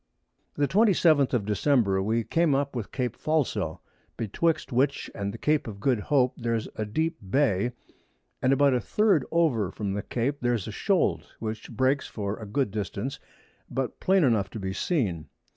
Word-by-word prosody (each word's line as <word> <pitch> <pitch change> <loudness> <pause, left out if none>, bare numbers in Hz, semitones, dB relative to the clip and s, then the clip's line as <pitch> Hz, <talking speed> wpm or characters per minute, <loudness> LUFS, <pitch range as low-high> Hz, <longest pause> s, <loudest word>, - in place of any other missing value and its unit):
] - - -46
The 145 -1 +1
27th 170 - +4
of 120 -6 0
December, 105 -2 +2
we 110 +4 0
came 165 +2 +2
up 140 0 -1
with 115 -4 -4
Cape 125 -4 -2
Falso, 155 -3 -1 0.4
betwixt 140 - 0
which 135 +3 0
and 100 0 -3
the 115 - -8
Cape 150 +3 +1
of 100 -3 -7
Good 125 +1 +1
Hope, 130 +2 +2
there's 115 -2 -1
a 110 - -2
deep 160 +9 -1
Bay, 125 -2 +2 0.7
and 130 - +3
about 140 0 +4
a 125 - +2
3d 205 - +2
over 145 - +2
from 100 0 -4
the 100 - -2
Cape, 130 +7 -2
there's 120 -5 0
a - - -4
Shold - - +1
which 110 -1 -5
breaks 135 +1 +1
for 100 -1 -4
a 110 - -7
good 125 +1 0
Distance, 105 +5 -4 0.5
but 130 0 -3
plain 190 -1 +3
enough 110 -8 +2
to 110 - -7
be 95 -1 -3
seen. 100 - -1
125 Hz, 175 wpm, -27 LUFS, 105-145 Hz, 0.7 s, 27th